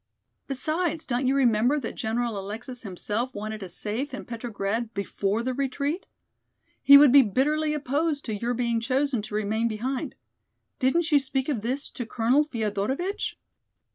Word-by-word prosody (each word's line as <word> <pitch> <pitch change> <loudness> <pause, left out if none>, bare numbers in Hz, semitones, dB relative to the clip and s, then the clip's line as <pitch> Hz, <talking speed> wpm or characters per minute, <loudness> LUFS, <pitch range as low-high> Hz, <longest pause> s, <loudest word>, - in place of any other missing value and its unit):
Besides, 315 +4 -1
don't 255 +1 0
you 270 - +3
remember 245 +2 +3
that 230 - -5
General 230 -1 -2
Alexis 225 +6 -6
himself 215 +5 -3
wanted 215 0 -5
us 180 -2 -6
safe 260 +6 -3
in - - -8
Petrograd 225 -1 -3
before 200 +2 -1
the 255 +1 -1
retreat. 280 +6 -2 0.7
He 280 0 +10
would 285 -2 +7
be 280 +1 +9
bitterly 300 +7 +1
opposed 290 +1 -1
to 220 - -3
your 235 +4 -2
being 235 -1 0
chosen 260 0 0
to 210 0 -7
remain 215 +2 0
behind. 245 +4 -3 0.6
Didn't 315 +5 +2
you 290 - +6
speak 265 0 -2
of 250 -8 -1
this 260 +6 -2
to 245 - -6
Colonel 245 +7 +2
Feodorovitch?" 260 - -2
250 Hz, 155 wpm, -26 LUFS, 220-280 Hz, 0.7 s, He